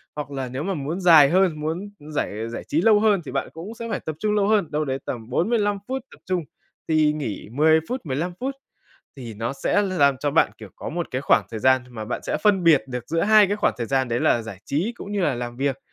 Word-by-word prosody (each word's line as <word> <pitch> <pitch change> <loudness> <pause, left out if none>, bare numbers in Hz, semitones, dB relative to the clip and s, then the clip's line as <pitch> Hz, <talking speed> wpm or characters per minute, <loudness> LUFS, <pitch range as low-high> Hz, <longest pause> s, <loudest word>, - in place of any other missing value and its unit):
hoặc 145 -1 -5
là 135 -2 -3
nếu 130 +3 -4
mà 195 +2 -1
muốn 155 +4 -4
dài 160 -6 +7
hơn, 180 -4 +2
muốn 165 +7 -3 0.3
giải 110 -3 -2
giải 120 - -6
trí 155 +4 0
lâu 210 0 +5
hơn 210 -4 +3
thì - - -6
bạn - - -2
cũng 175 +8 -8
sẽ 230 0 -6
phải - - -2
tập 155 - -5
trung 210 0 0
lâu 200 -1 +2
hơn, 210 -8 +2
đâu 150 +1 0
đấy 135 0 -2
tầm 115 -1 -6
45 205 - +1
phút 265 +1 -3
tập - - -16
trung 180 -2 -1 0.4
thì 155 -1 +3
nghỉ 135 -9 -5
10 155 +5 +4
phút, 255 +1 -2
15 155 +6 -2
phút. 270 +2 -3 0.6
Thì 120 -4 -8
nó 115 +4 -3
sẽ 140 +9 +1
làm 145 -9 +2
cho 145 +2 -1
bạn, 160 - +3
kiểu, - - -10
có - - -6
một 170 +1 -3
cái 130 - -2
khoảng - - +3
thời 110 -2 -5
gian 130 0 +4
mà 110 -3 -6
bạn 120 - -4
sẽ - - -2
phân 195 -4 +3
biệt 160 -4 +5
được 125 -2 -5
giữa 165 +1 0
hai 215 -1 +6
cái 205 +2 -1
khoảng - - +1
thời 115 - -2
gian 135 -2 0
đấy 120 +1 -1
là 120 - +2
giải 105 -4 -8
trí 180 +12 -1
cũng 205 - -8
như 205 - -1
là 145 -7 +1
làm 120 0 -5
việc. 135 0 -1
155 Hz, 260 wpm, -23 LUFS, 130-195 Hz, 0.6 s, dài